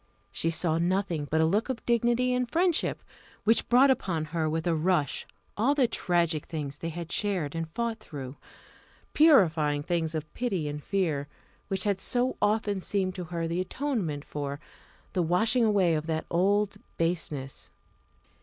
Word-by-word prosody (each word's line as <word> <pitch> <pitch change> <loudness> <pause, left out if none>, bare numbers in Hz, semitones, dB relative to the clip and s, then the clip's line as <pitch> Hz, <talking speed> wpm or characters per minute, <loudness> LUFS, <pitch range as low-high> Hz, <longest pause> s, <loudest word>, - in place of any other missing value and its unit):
She 165 - 0
saw 165 0 +1
nothing 175 -3 0
but 160 +1 +2
a - - +4
look 205 +10 +1
of 255 -3 -4
dignity 240 +1 +2
and 250 -1 0
friendship, 345 +2 +1 0.4
which 225 +2 +2
brought 260 +3 +6
upon 170 -11 -1
her 160 0 -1
with 160 +1 -2
a 170 - +2
rush 160 -3 0 0.3
all 255 +7 +2
those 260 -5 +3
tragic 170 -4 0
things 145 -3 -5
they 165 - -3
had 170 0 -6
shared 185 -9 -1
and 165 -1 -3
fought 230 +5 -2
through, 135 -8 -8 0.8
purifying 165 - +4
things 165 -1 -1
of 155 -1 -5
pity 195 -11 -1
and 145 0 -5
fear, 160 -8 -1 0.4
which 195 -1 -2
had 200 -2 0
so 250 +1 +1
often 205 -2 +1
seemed 190 -1 -1
to 180 -1 -5
her 165 0 -3
the 170 +2 -1
atonement 185 - -2
for, 145 -1 -4 0.5
the 185 - +1
washing 220 +8 +3
away 195 -6 +3
of 155 0 -2
that 160 -1 -1
old 200 +3 +2 0.2
baseness. 155 -5 -2
175 Hz, 165 wpm, -28 LUFS, 160-215 Hz, 0.8 s, brought